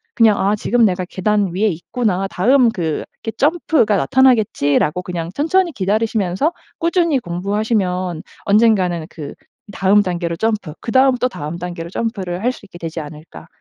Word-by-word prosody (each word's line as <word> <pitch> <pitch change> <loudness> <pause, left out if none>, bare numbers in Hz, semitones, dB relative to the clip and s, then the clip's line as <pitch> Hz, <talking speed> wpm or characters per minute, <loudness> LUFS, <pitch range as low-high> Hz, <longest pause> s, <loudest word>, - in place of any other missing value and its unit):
그냥 220 -3 +4
'아. 200 +2 +2
지금 235 +2 +2
내가 185 -2 0
계단 200 -1 0
위에 205 +4 +1
있구나. 195 +2 -1
다음 245 +7 +3
그 160 -7 -2 0.2
이렇게 225 - -3
점프가 295 - +2
나타나겠지.'라고 180 - +2
그냥 170 -2 -4
천천히 340 +4 +2
기다리시면서 210 - 0 0.3
꾸준히 335 -4 +2
공부하시면 185 -2 -2 0.2
언젠가는 200 -6 +3
그 145 -3 -8 0.4
다음 195 +2 +4
단계로 175 -2 -2
점프, 215 -8 -1
그다음 260 +2 +3
또 250 +1 0
다음 160 -5 -6
단계로 175 -1 -6
점프를 190 -3 -3
할 250 - +2
수 - - -12
있게 195 - -13
되지 165 -1 -5
않을까 150 - -10
195 Hz, 360 characters per minute, -18 LUFS, 175-230 Hz, 0.4 s, 그냥